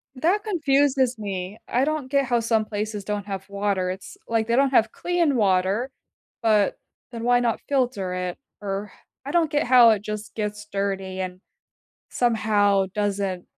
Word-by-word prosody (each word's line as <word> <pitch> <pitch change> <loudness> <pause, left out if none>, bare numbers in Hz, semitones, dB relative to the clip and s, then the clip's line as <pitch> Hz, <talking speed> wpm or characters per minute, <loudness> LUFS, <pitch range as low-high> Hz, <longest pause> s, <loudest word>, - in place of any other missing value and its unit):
That 360 +10 +1
confuses 275 - +2
me. 195 0 -4
I 250 - +1
don't 295 -3 -1
get 280 -1 +2
how 240 -1 +1
some 225 -1 +1
places 210 -1 -4
don't 210 -1 -3
have 195 -1 -6
water, 200 -2 -1
it's 190 +1 -7
like 225 -1 +1
they 235 - +2
don't 275 +2 +4
have 225 -3 +3
clean 345 -5 +1
water, 200 +4 +1 0.5
but 215 -3 +3 0.4
then 230 -1 -6
why 245 0 +4
not 235 -2 0
filter 245 -9 0
it, 180 -1 -3 0.2
or 200 +1 -4 0.3
I 285 - -4
don't 330 -3 +2
get 295 -1 +2
how 245 -2 +8
it 215 -3 +2
just 210 0 -6
gets 210 -1 -4
dirty 195 -1 -2
and 185 0 -5 0.7
somehow 205 -4 +2
doesn't 200 -3 -1
215 Hz, 165 wpm, -24 LUFS, 200-255 Hz, 0.7 s, how